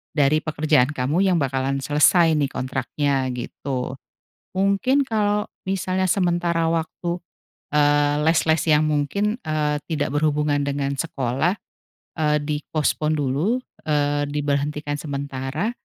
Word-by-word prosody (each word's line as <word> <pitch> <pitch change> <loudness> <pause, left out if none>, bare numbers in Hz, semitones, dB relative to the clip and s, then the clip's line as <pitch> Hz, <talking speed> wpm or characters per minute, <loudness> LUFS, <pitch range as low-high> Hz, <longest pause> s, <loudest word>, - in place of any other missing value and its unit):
dari 150 0 +3
pekerjaan 150 -4 +2
kamu 135 +6 0
yang 185 - +3
bakalan 135 -2 -1
selesai 160 +4 +4
nih 145 - +2
kontraknya, 130 +1 -1
gitu. 130 +1 -4 0.6
Mungkin 250 +9 +2
kalau 210 -2 0 0.2
misalnya 185 0 0
sementara 175 -3 +1
waktu, 170 +2 -2 0.5
eee, 145 0 +3
les-les 160 0 +2
yang 155 0 +4
mungkin, 200 - 0
eee, 150 -1 -1
tidak 145 -3 -1
berhubungan 150 -1 +1
dengan 140 0 -1
sekolah, 140 - -1 0.6
eee, 150 -1 +3
di-postpone 150 +1 -1
dulu, 145 - 0 0.3
eee, 145 -1 +1
diberhentikan 145 0 -2
sementara, 140 - -3
150 Hz, 110 wpm, -23 LUFS, 140-165 Hz, 0.6 s, selesai